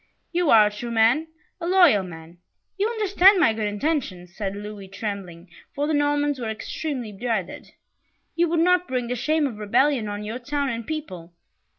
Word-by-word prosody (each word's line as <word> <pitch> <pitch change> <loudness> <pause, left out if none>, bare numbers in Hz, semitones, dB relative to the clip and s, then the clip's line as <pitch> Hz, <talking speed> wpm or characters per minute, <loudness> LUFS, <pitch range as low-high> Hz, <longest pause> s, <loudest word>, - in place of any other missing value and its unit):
"You 350 -2 +1
are 220 -2 +7
a 210 - 0
true 225 +3 -6
man, 235 +7 +3 0.3
a 340 - -4
loyal 350 - +5
man 170 -1 -11 0.4
you 405 +2 0
understand 400 -3 +4
my 225 -10 +4
good 220 -1 -2
intentions," 205 - -3
said 200 -2 -3
Louis, 205 -1 -8
trembling, 195 -4 -6 0.3
for 285 - 0
the 310 - -1
Normans 290 -1 +1
were 230 -2 -3
extremely 245 +2 -5
dreaded. 210 -3 -4 0.6
"You 340 0 +2
would 330 0 +1
not 360 +1 +3
bring 250 -2 -2
the 250 - -1
shame 305 +5 +1
of 235 -6 -4
rebellion 235 +3 +2
on 205 0 -5
your 220 +4 -5
town 280 +2 -2
and 230 -2 -5
people. 185 - -6
240 Hz, 180 wpm, -24 LUFS, 205-305 Hz, 0.6 s, are